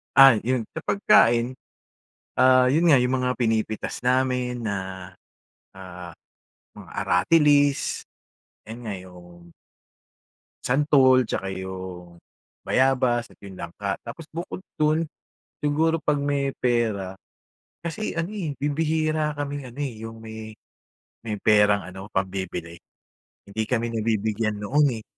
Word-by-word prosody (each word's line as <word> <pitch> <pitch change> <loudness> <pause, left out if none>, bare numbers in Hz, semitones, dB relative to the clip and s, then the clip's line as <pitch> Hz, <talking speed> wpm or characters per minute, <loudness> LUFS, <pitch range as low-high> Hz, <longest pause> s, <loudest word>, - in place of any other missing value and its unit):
Ah, 135 -5 +8
yun 125 +1 -1
sa - - -5
pagkain, 120 - +4 0.8
ah, 130 0 +5
yun 165 +4 +3
nga 150 - +7
yung 125 0 +2
mga 125 0 0
pinipitas 110 -2 -1
namin 125 -1 0
na, 95 -3 -5 0.6
ah, 90 -2 -9 0.6
mga - - -12
aratilis. 145 - +3 0.6
'Yan 110 +2 -8
nga, 105 - -3
yung 90 -2 -14 1.1
santol, 130 -2 +4
tsaka 95 -2 -3
yung 95 -2 -7 0.4
bayabas, 130 -3 +2
at - - -20
'yong 95 -2 -10
langka. 95 +4 -4
Tapos 135 +7 -8
bukod 170 +3 -6 0.2
dun 155 +2 +3 0.6
siguro 160 +3 +2
'pag 150 -1 +1
may 140 -1 0
pera 110 -6 0 0.7
kasi, 170 +3 -3
ano, 170 +5 -2
eh, 165 -9 -4
bibihira 155 +1 0
kaming, 145 -2 -4
ano, 120 - -16
eh, 140 -4 -3
yung 115 0 -7
may 110 -1 -9 0.7
may 110 - -2
perang 105 -1 +4
ano, 95 +2 -9
pambibili. 95 -3 -3 0.7
Hindi 105 +2 -3
kami 120 -1 -1
nabibigyan 110 -1 0
noon, 145 +7 +3
eh. 110 - -8
120 Hz, 120 wpm, -24 LUFS, 100-145 Hz, 1.1 s, Ah